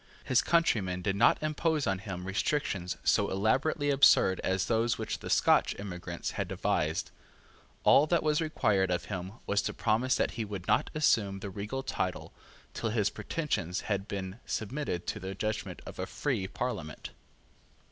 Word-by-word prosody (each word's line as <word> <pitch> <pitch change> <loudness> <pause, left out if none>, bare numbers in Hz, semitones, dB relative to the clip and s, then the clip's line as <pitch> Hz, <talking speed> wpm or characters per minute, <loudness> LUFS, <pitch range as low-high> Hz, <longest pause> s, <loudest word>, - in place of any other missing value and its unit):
His 130 -1 +3
countrymen 100 - +1
did 95 0 0
not 105 - +5
impose 155 0 0
on 95 -1 0
him 90 -2 -6
restrictions 95 -2 -1
so - - +3
elaborately 140 +9 +1
absurd 135 -8 +5
as 95 0 +1
those 115 +1 +1
which - - -3
the - - -7
Scotch - - +4
emigrants 95 -3 -5
had - - -3
devised. - - -1 0.7
All 150 - +6
that 170 0 +2
was 150 0 +2
required 105 - +1
of 90 -1 -1
him 95 +1 -5
was 100 0 +1
to - - -3
promise 120 +4 +2
that - - +1
he 115 - -3
would 100 -4 -6
not - - +2
assume 105 -10 +2
the 100 0 -6
regal 105 +7 -4
title 95 -8 -3 0.4
till 115 - -2
his 105 -2 +1
pretensions 105 - -2
has 100 -2 -1
been 100 0 -5
submitted 110 - -3
to 110 - -3
the 95 0 -5
judgment 110 +2 -3
of - - -9
a - - -2
free 95 - -2
Parliament. 95 -9 -5
105 Hz, 165 wpm, -30 LUFS, 95-130 Hz, 0.7 s, All